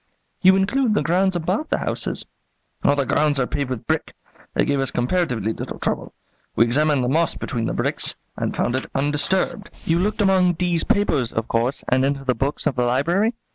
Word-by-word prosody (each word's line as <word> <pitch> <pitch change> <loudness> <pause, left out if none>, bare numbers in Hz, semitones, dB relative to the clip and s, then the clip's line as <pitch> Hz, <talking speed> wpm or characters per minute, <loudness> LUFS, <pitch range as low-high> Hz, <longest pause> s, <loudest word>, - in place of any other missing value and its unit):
"You 190 0 +7
include 215 +4 +1
the - - +1
grounds 185 +2 +2
about 185 - -1
the - - +1
houses?" - - -3 0.6
"All 140 - +4
the 140 -1 0
grounds 145 +2 +1
are 130 - +2
paved 140 0 -3
with 125 -4 -4
brick. - - -2 0.4
They - - +3
gave 140 -1 0
us 135 -2 0
comparatively 125 - 0
little - - -6
trouble. - - -3 0.4
We 115 - +5
examined 145 +2 +2
the - - 0
moss 160 +5 +1
between 115 -3 -3
the - - -2
bricks - - 0 0.2
and - - -3
found 120 - 0
it 130 - -3
undisturbed." 150 - 0 0.2
"You 165 +1 +2
looked 210 +4 0
among 185 -2 +4
D 175 +1 0
's 165 - +2
papers, 150 - +1
of 115 +1 -2
course, 120 +4 0
and 130 +1 +2
into 140 0 0
the 130 -1 +1
books 135 +5 -2
of 135 - +1
the 125 - +1
library?" 170 - +1
145 Hz, 205 wpm, -22 LUFS, 130-185 Hz, 0.6 s, You